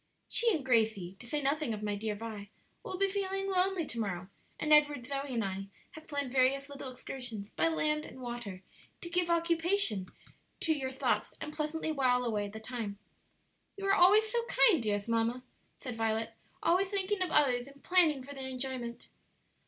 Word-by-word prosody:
"She 470 -1 +5
and 310 -9 -1
Gracie, 220 -7 +1
to 245 - -10
say 295 +3 -1
nothing 275 -4 0
of 210 - -8
my 210 -1 -1
dear 210 +1 -3
Vi, 210 -2 -7 0.3
will 370 - -5
be 395 +1 +3
feeling 390 0 -2
lonely 370 -2 +2
to 235 - -4
morrow, 185 -4 -3 0.3
and 305 0 +3
Edward, 295 -4 +4
Zoe, 275 +1 -3
and 230 -4 0
I 195 0 -4 0.2
have 315 0 -12
planned 285 -4 -3
various 270 +2 +2
little 275 -2 -7
excursions, 245 -5 -5
by - - +1
land 305 -2 +1
and 260 - -11
water, 235 -7 -6 0.4
to 345 - -6
give 350 0 +1
occupation 335 - +1 0.5
to 320 - +3
your 270 -4 -2
thoughts 265 - -1
and 300 - -6
pleasantly 310 +1 -2
while 250 -4 +2
away 210 -3 -1
the 215 +2 -8
time." 220 -3 -5 0.8
"You 395 - -5
are 390 - +4
always 410 +4 +6
so 470 +2 0
kind, 430 - +5
dearest 205 -2 -1
mamma," 230 +2 0 0.3
said 245 -3 -6
Violet; 225 0 -1 0.3
"always 370 +3 +3
thinking 400 0 -1
of 365 - +1
others 260 -5 +3
and 280 0 -16
planning 325 -7 +4
for 285 +2 -9
their 265 -1 -6
enjoyment." 255 -2 -5
270 Hz, 185 wpm, -32 LUFS, 225-330 Hz, 0.8 s, always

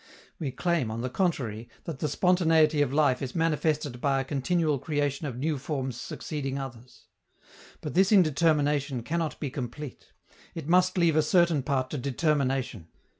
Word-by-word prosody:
We 150 -5 -2
claim, 150 -1 0
on 110 +1 -4
the 130 +1 -3
contrary, 125 - -1
that 160 -5 -6
the 150 - 0
spontaneity 160 -4 +3
of 140 -3 +1
life 140 -3 +2
is 130 -2 -5
manifested 155 -5 0
by 140 -2 +2
a - - 0
continual 150 +2 0
creation 145 0 -1
of 125 -3 -5
new 150 +2 -1
forms 135 -3 -3
succeeding 135 +2 -4
others. 125 -3 -9 0.8
But - - -5
this 190 +2 +4
indetermination 150 - +2
cannot 165 +2 -2
be 145 -4 -3
complete; 130 +1 -7 0.4
it 160 -4 -6
must 185 +2 +3
leave 170 -3 +3
a 155 - +5
certain 170 -1 +3
part 130 -2 -1
to 150 - -3
determination. 135 - -1
145 Hz, 160 wpm, -28 LUFS, 130-160 Hz, 0.8 s, a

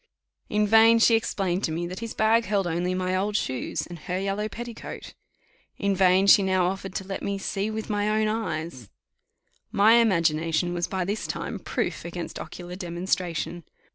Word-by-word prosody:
In 210 0 +2
vain 225 +2 +6
she 230 +1 +5
explained 195 -5 0
to 160 - -2
me 170 +2 -2
that 180 +2 -6
his 230 -1 -6
bag 225 +1 +3
held 200 -1 0
only 175 +2 -1
my 185 0 -1
old 200 +2 -1
shoes 130 -9 -3
and 175 -1 -10
her 180 +4 -3
yellow 200 +2 -2
petticoat. 235 0 -8 0.6
In 200 -1 0
vain 190 0 +4
she 200 - +7
now 190 -1 +2
offered 190 +1 -3
to - - -2
let 195 0 -5
me 200 0 -2
see 195 +1 -2
with 220 0 -4
my 205 -1 0
own 215 0 +2
eyes. 160 - -3 0.8
My 220 +4 +6
imagination 170 -5 +2
was 175 0 -1
by 190 -2 -2
this 205 +3 -3
time - - -4
proof - - -3
against - - -6
ocular 180 0 -8
demonstration. 175 -1 -3
190 Hz, 175 wpm, -26 LUFS, 175-215 Hz, 0.8 s, she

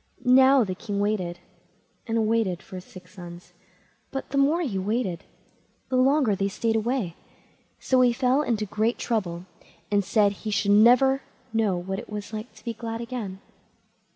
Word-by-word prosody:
Now 260 +1 +6
the 190 -3 -3
king 200 +1 -4
waited 200 -4 -1 0.7
and 225 -1 +1
waited 215 -5 0
for 185 - -9
his 180 - -9
six 185 -1 -14
sons, 175 -1 -11 0.6
but 270 -1 -6
the 280 - -1
more 300 +5 +3
he 210 - -2
waited, 200 -2 -2 0.6
the 255 - -1
longer 260 -3 +3
they 195 +1 0
stayed 225 +3 -1
away; 225 -5 -1 0.7
so 260 -1 +2
he 250 -1 +5
fell 255 +3 +2
into 225 -7 -1
great 215 +4 0
trouble, 185 -7 -2 0.5
and 205 -1 +3
said 205 +1 +3
he 210 +2 -7
should 205 -1 +1
never 250 +6 +5 0.3
know 215 -5 +1
what 190 +2 -4
it 235 - -10
was 210 -1 -5
to 215 +2 -8
be 235 - -2
glad 225 0 -5
again. 230 -5 -5
220 Hz, 165 wpm, -25 LUFS, 195-250 Hz, 0.7 s, Now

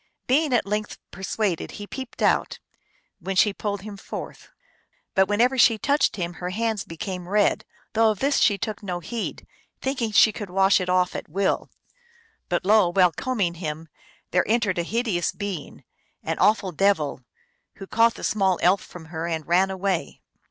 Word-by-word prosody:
Being 290 +3 +2
at 245 - +2
length 210 +1 -3
persuaded, 190 -1 -2
he 205 - -7
peeped 260 +4 -7
out, - - +2 0.6
when 195 0 -4
she 205 +2 +4
pulled 205 -1 -4
him 205 -1 -8
forth. - - -8 0.6
But 190 0 +4
whenever 245 +6 +2
she 230 -2 +6
touched 285 +6 +1
him 175 -3 -3
her 180 - -2
hands 220 +1 -1
became 180 +2 -6
red, 205 0 +2 0.3
though 225 0 +4
of 215 - -1
this 275 +7 +1
she 205 -3 +4
took 215 0 -4
no 180 -4 -4
heed, 220 +7 -5 0.3
thinking 255 -4 -2
she 215 +1 +6
could 205 -2 -7
wash 195 +1 +3
it 180 - -3
off 180 0 +2
at - - -6
will. 195 +4 0 0.8
But 175 0 -1
lo! 205 -3 +5
while 180 -1 +4
combing 205 -4 -1
him, 160 -2 -6 0.4
there 180 - +3
entered 215 -5 +1
a - - +1
hideous 215 -3 -1
being, 200 -7 -6 0.4
an - - -3
awful 205 -3 +3
devil, 160 -7 +1 0.5
who 195 - -9
caught 230 +3 +3
the - - -10
small 190 -4 +2
elf 185 +2 +4
from 175 -2 -11
her 160 +1 -3
and 160 -2 -3
ran 185 +3 +3
away. 190 -2 -2
195 Hz, 175 wpm, -24 LUFS, 180-220 Hz, 0.8 s, she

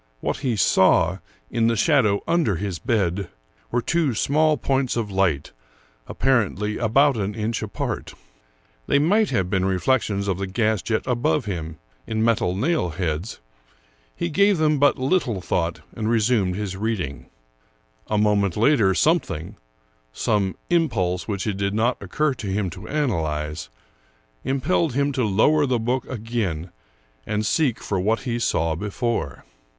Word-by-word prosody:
What - - -2
he 130 -4 -1
saw, 95 -2 +3 0.3
in 115 -1 +2
the 115 - +2
shadow 115 -6 +2
under 165 - +2
his 90 -1 -4
bed, 100 -5 0 0.4
were 120 0 0
two 165 -8 +1
small 155 +6 +2
points 130 0 0
of 110 -3 -2
light, 95 -7 0 0.6
apparently 105 -5 0
about 135 +4 +3
an 100 0 -2
inch 115 +1 -2
apart. 110 -2 -4 0.7
They - - +3
might 200 +9 +3
have 95 -8 0
been 95 0 0
reflections 100 +2 0
of 95 -2 -1
the 100 - -2
gas 110 0 0
jet 110 +4 -1
above 130 +2 0
him, 80 -5 -5 0.3
in 110 -1 -1
metal 110 -6 +1
nail 135 - 0
heads; 85 - -3 0.7
he 170 - -2
gave 200 +4 +4
them 155 -2 +2
but 145 0 +4
little 130 - 0
thought 85 -1 -2
and 110 -1 -2
resumed 110 -5 +2
his 100 -2 -4
reading, 90 - -3 0.8
A 105 - 0
moment 105 -3 +2
later 110 -5 +3
some 165 +3 +4
thing 80 - -7 0.3
— - - -39 0.2
some 95 - 0 0.2
impulse 95 - +1
which 100 -3 -3
it 105 -3 -2
did 100 +1 -1
not 115 +3 +1
occur 140 +10 0
to 115 -5 -7
him 95 -1 -1
to 95 +4 -9
analyze 80 - -2 0.4
— - - -38
impelled 155 +1 +1
him 140 +1 +1
to 130 -2 -1
lower 140 +9 +3
the 125 -1 +1
book 120 +3 -1
again 105 -9 -3 0.6
and 105 0 -1
seek 130 0 +1
for 100 - -2
what 110 +5 +1
he 120 -2 -2
saw 80 -7 +1
before. 105 - -3
110 Hz, 155 wpm, -23 LUFS, 95-130 Hz, 0.8 s, gave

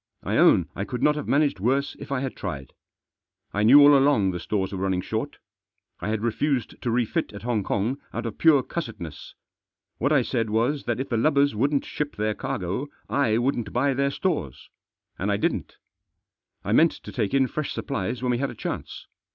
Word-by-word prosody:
I - - -1
own - - +5
I 100 - -2
could 125 +3 -4
not 150 0 +4
have 150 - -5
managed 140 -8 +2
worse 135 +7 0
if - - -9
I 135 -2 0
had 135 -1 -4
tried. 70 -9 -6 0.8
I 105 - 0
knew 125 +7 +8
all 145 0 +8
along 135 -9 +3
the 90 - -4
stores 95 +1 -2
were 95 - -4
running 95 -1 0
short. - - -4 0.6
I - - -3
had 110 0 -1
refused 125 +2 -1
to 120 - -2
refit 120 -1 0
at 100 0 -9
Hong 120 -3 0
Kong 110 +8 -1
out 115 - -4
of 115 - -5
pure 150 -5 +5
cussedness. 105 - -7 0.6
What 140 +5 +1
I 140 -4 +4
said 115 -3 -1
was 120 +7 0
that 120 0 -1
if 130 - -3
the 115 - 0
lubbers 140 +3 +3
wouldn't 140 +6 +1
ship 150 -1 -4
their 105 +1 0
cargo, 100 +8 -3 0.2
I 115 -6 +2
wouldn't 120 -1 -1
buy 140 +3 +2
their 140 +1 +1
stores. 140 - -3 0.5
And - - 0
I - - +1
didn't. - - -2 0.9
I - - -2
meant - - +5
to - - -10
take 105 +4 -1
in 135 -1 +4
fresh 150 +3 -3
supplies 125 -2 -3
when 125 - +1
we 120 - 0
had 140 0 -1
a 120 - -8
chance. - - -6
120 Hz, 200 wpm, -25 LUFS, 105-140 Hz, 0.9 s, knew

